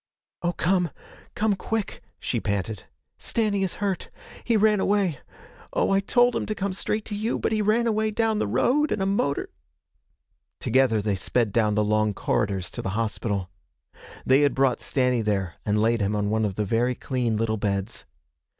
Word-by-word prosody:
'Oh, 175 Hz, 0 st, 0 dB
come 180 Hz, 0 st, +1 dB, 0.5 s
come 215 Hz, -1 st, +2 dB
quick!' 220 Hz, +2 st, -3 dB, 0.2 s
she -, -, -1 dB
panted. 100 Hz, 0 st, -3 dB, 0.3 s
'Stanny 210 Hz, -3 st, 0 dB
is 190 Hz, -2 st, -1 dB
hurt 200 Hz, -3 st, -2 dB, 0.3 s
He 230 Hz, -2 st, +2 dB
ran 210 Hz, -1 st, +4 dB
away 190 Hz, -8 st, +1 dB, 0.5 s
Oh, -, -, +1 dB
I 195 Hz, -, +4 dB
told 245 Hz, +5 st, +3 dB
him -, -, -2 dB
to 215 Hz, -, -2 dB
come 200 Hz, -1 st, -2 dB
straight 210 Hz, +3 st, -2 dB
to 210 Hz, -, -4 dB
you! 215 Hz, +3 st, -1 dB
But -, -, -1 dB
he 215 Hz, -1 st, +1 dB
ran 215 Hz, +3 st, +2 dB
away 220 Hz, -1 st, +1 dB
down 220 Hz, 0 st, +1 dB
the -, -, 0 dB
road, 255 Hz, -, +2 dB
and -, -, 0 dB
a 190 Hz, -, 0 dB
motor 195 Hz, -8 st, 0 dB, 0.6 s
' -, -, -49 dB
Together 115 Hz, -4 st, +2 dB
they 105 Hz, -1 st, +1 dB
sped 105 Hz, +3 st, 0 dB
down 105 Hz, -3 st, +2 dB
the 105 Hz, -, +3 dB
long 110 Hz, -1 st, +1 dB
corridors 95 Hz, -3 st, -1 dB
to -, -, -5 dB
the 95 Hz, +2 st, -3 dB
hospital. 105 Hz, -4 st, -2 dB, 0.7 s
They 130 Hz, +2 st, +5 dB
had 145 Hz, -1 st, +3 dB
brought 135 Hz, -2 st, +2 dB
Stanny 125 Hz, -3 st, +1 dB
there 100 Hz, -4 st, -1 dB
and 105 Hz, +1 st, +2 dB
laid 115 Hz, +1 st, +2 dB
him 100 Hz, +1 st, 0 dB
on 105 Hz, 0 st, 0 dB
one 110 Hz, 0 st, +1 dB
of 100 Hz, -3 st, -2 dB
the 105 Hz, -, -1 dB
very 120 Hz, +5 st, +1 dB
clean 120 Hz, -4 st, -1 dB
little 110 Hz, 0 st, 0 dB
beds. 100 Hz, -2 st, -2 dB
130 Hz, 185 wpm, -25 LUFS, -, 0.7 s, They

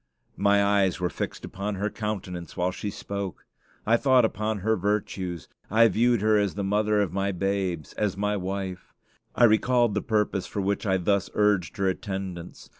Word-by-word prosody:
My 100 Hz, 0 st, +4 dB
eyes 100 Hz, -3 st, +2 dB
were 90 Hz, -1 st, -1 dB
fixed -, -, -5 dB
upon 100 Hz, +1 st, -4 dB
her 105 Hz, +2 st, -2 dB
countenance 95 Hz, -6 st, -5 dB
while 90 Hz, +1 st, +1 dB
she 105 Hz, -, -5 dB
spoke. 100 Hz, -3 st, -6 dB, 0.4 s
I 115 Hz, +2 st, +4 dB
thought 130 Hz, -2 st, +4 dB
upon 110 Hz, -1 st, -2 dB
her 110 Hz, +3 st, +2 dB
virtues; 95 Hz, -4 st, -2 dB, 0.2 s
I 115 Hz, +3 st, +6 dB
viewed 115 Hz, +2 st, +2 dB
her 110 Hz, 0 st, +4 dB
as 100 Hz, -2 st, 0 dB
the 100 Hz, -, -2 dB
mother 105 Hz, +1 st, +1 dB
of 95 Hz, -4 st, -1 dB
my 100 Hz, +1 st, 0 dB
babes; 95 Hz, -4 st, -2 dB
as 100 Hz, -3 st, -1 dB
my 105 Hz, +1 st, 0 dB
wife. 95 Hz, -1 st, -5 dB, 0.4 s
I -, -, +3 dB
recalled 120 Hz, 0 st, +4 dB
the 105 Hz, -, 0 dB
purpose 105 Hz, -3 st, 0 dB
for -, -, -5 dB
which 100 Hz, +2 st, -1 dB
I 95 Hz, -1 st, +3 dB
thus 100 Hz, +2 st, 0 dB
urged 105 Hz, -6 st, +2 dB
her 100 Hz, -1 st, +1 dB
attendance. 95 Hz, -3 st, -5 dB
100 Hz, 180 wpm, -26 LUFS, 95-105 Hz, 0.4 s, I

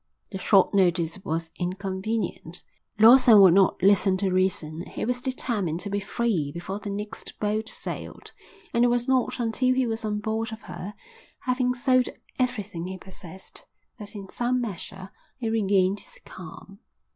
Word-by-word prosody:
The 190 Hz, -, -5 dB
short 195 Hz, +1 st, +4 dB
notice 180 Hz, -1 st, +1 dB
was 165 Hz, +1 st, -3 dB
inconvenient. 190 Hz, 0 st, -3 dB, 0.3 s
Lawson 230 Hz, 0 st, +8 dB
would 190 Hz, -3 st, +8 dB
not 190 Hz, -1 st, +3 dB
listen 195 Hz, -1 st, +4 dB
to 190 Hz, 0 st, 0 dB
reason. 175 Hz, -3 st, 0 dB
He -, -, -4 dB
was 245 Hz, +1 st, -1 dB
determined 215 Hz, -10 st, -2 dB
to 205 Hz, -, -5 dB
be 205 Hz, -, 0 dB
free 200 Hz, -7 st, -1 dB
before 185 Hz, +5 st, -5 dB
the 210 Hz, -, -6 dB
next 205 Hz, +1 st, -6 dB
boat 215 Hz, +1 st, -1 dB
sailed; -, -, -6 dB, 0.4 s
and 235 Hz, -, +3 dB
it -, -, +6 dB
was 240 Hz, +1 st, +1 dB
not 260 Hz, -1 st, +1 dB
until 250 Hz, +2 st, +1 dB
he 260 Hz, -1 st, +2 dB
was 225 Hz, 0 st, -2 dB
on 210 Hz, -1 st, -1 dB
board 220 Hz, +2 st, -2 dB
of 220 Hz, +1 st, -8 dB
her, 180 Hz, +3 st, -8 dB, 0.5 s
having 250 Hz, 0 st, 0 dB
sold 255 Hz, 0 st, +2 dB, 0.3 s
everything 205 Hz, -9 st, -2 dB
he 190 Hz, 0 st, -6 dB
possessed, 190 Hz, -1 st, -12 dB, 0.4 s
that 210 Hz, +1 st, -9 dB
in 200 Hz, -2 st, -7 dB
some 245 Hz, +5 st, -1 dB
measure 195 Hz, -3 st, -6 dB, 0.3 s
he 235 Hz, -4 st, -3 dB
regained 200 Hz, -2 st, +2 dB
his -, -, -12 dB
calm. 190 Hz, +3 st, -11 dB
205 Hz, 160 wpm, -26 LUFS, 185-230 Hz, 0.5 s, Lawson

